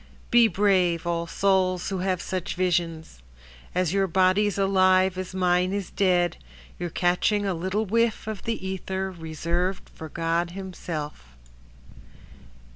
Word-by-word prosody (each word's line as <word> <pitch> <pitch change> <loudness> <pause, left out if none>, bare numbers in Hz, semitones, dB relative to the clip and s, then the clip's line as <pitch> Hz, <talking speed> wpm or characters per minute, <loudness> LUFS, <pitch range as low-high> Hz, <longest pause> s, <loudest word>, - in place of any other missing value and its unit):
Be 235 -1 +7
brave, 185 -4 +2
all 170 -1 -1
souls 185 -1 +1
who 190 -2 -2
have 185 -1 -1
such 185 -2 -3
visions 165 - -1 0.5
As 180 -2 +1
your 195 -1 +2
body's 190 +3 +2
alive 185 -1 +3
as 185 0 -6
mine 180 0 +2
is 200 -2 -3
dead, 180 -3 +2 0.4
You're 175 - -3
catching 180 +5 +1
a 195 - 0
little 190 +6 -1
whiff 230 +2 +1
of 215 -3 -5
the 225 -4 -3
ether 190 0 -3
Reserved 170 +2 -3
for 160 - -9
God 170 +2 -1
Himself. 150 - -6
185 Hz, 130 wpm, -25 LUFS, 175-195 Hz, 0.5 s, Be